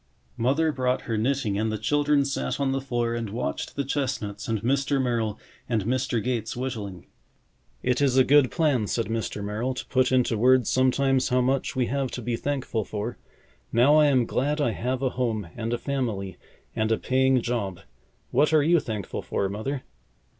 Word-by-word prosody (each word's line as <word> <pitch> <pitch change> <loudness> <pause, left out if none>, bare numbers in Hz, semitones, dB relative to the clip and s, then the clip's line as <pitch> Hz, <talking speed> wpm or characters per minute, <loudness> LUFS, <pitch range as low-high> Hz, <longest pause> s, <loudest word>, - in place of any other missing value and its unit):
Mother 140 +7 +2
brought 130 -2 0
her 115 - -3
knitting 110 -3 0
and 110 0 0
the 110 - -2
children 145 +2 +2
sat 65 - -2
on 140 -1 +1
the 135 0 -1
floor 120 -3 -1
and 115 -2 -3
watched 115 +5 -4
the 140 - -1
chestnuts 130 -7 -3
and 110 -1 0
Mr. 135 +2 +1
Merrill 115 -5 0 0.3
and 110 -4 +1
Mr. 120 -2 0
Gates 120 -2 -2
whittling. 105 -8 -5 0.8
"It 125 +1 +1
is 135 -2 +3
a 130 - +7
good 140 -1 +5
plan," 145 - +1
said 115 +2 -1
Mr. 110 -2 -3
Merrill, 110 +6 -2
"to - - -5
put 130 -1 +2
into 125 -4 +2
words 125 0 +4
sometimes 130 0 +2
how 125 - +2
much 130 +2 0
we 130 -1 +2
have 135 +1 -1
to - - -4
be 120 -1 -1
thankful 130 -4 -2
for. 105 +4 -5 0.5
Now 130 +6 +5
I 150 -1 +6
am 130 -4 +3
glad 145 +6 -1
I 145 -6 +2
have 125 +4 -2
a 130 - +2
home 115 -6 -2
and 115 0 -3
a 120 - 0
family 115 -9 -3 0.4
and 110 0 0
a 110 - +3
paying 130 0 +2
job. 110 -7 -3 0.5
What 150 +5 +3
are 155 -2 +5
you 170 +3 +4
thankful 110 -8 -4
for, 100 - -1
Mother?" 125 +7 -4
125 Hz, 190 wpm, -26 LUFS, 110-135 Hz, 0.8 s, a